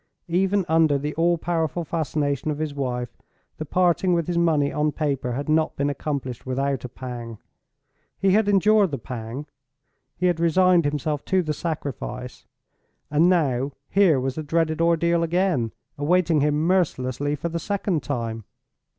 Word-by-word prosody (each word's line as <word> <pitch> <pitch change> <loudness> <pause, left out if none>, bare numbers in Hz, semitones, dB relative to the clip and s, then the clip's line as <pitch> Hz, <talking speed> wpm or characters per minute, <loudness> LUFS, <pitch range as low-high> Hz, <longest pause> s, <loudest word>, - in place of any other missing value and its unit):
Even 190 +2 +1
under 160 -2 +3
the 150 +2 -3
all 170 +1 +2
powerful 165 0 -1
fascination 150 -3 -1
of 150 - -2
his 155 -1 -3
wife 125 -3 -3 0.4
the 155 - -4
parting 180 +2 +2
with 170 -2 0
his 175 - -2
money 160 -4 +2
on 150 0 +1
paper 140 -5 -2
had 140 +4 -4
not 155 +1 +1
been 140 +1 0
accomplished 140 -4 -4
without 135 +1 -1
a 125 - -5
pang. 120 -3 -7 0.8
He 195 -1 +2
had 205 +1 +3
endured 205 0 +4
the 140 - -3
pang; 120 +2 -6 0.7
he 180 - -1
had 175 -2 +2
resigned 175 0 +4
himself 145 0 -1
to 190 -1 +2
the 155 -2 -2
sacrifice. 140 -5 -5 0.6
And 160 +4 +4
now 140 -6 +1 0.2
here 190 -8 +4
was 130 0 -2
the 155 - -4
dreaded 160 +1 0
ordeal 170 0 +2
again, 170 - +1 0.3
awaiting 165 0 +2
him 150 +2 +1
mercilessly 145 -6 0
for 160 +4 -4
the 170 0 -3
second 190 -3 -1
time! 115 -3 -3
155 Hz, 160 wpm, -24 LUFS, 140-170 Hz, 0.8 s, endured